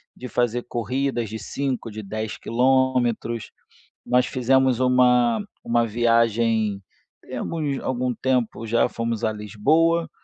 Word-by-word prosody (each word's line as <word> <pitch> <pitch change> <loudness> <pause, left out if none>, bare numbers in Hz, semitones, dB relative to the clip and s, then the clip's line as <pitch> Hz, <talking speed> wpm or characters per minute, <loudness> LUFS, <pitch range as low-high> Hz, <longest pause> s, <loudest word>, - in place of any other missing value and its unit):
de 125 - -8
fazer 120 0 0
corridas 120 0 -2
de 110 0 -6
5, 135 -4 -3
de 110 0 -7
10 110 +2 -4
quilômetros. 125 -2 +1 0.5
Nós 125 0 +3
fizemos 130 -1 +2
uma 125 - +3 0.2
uma 120 0 +2
viagem, 115 -2 +1 0.4
tem - - -8
alguns 150 -5 -2
algum 125 -1 -1
tempo 125 -3 -1
já, 115 +1 +2
fomos 115 -1 -3
à 110 - 0
Lisboa, 155 - +1
120 Hz, 125 wpm, -23 LUFS, 115-130 Hz, 0.5 s, Nós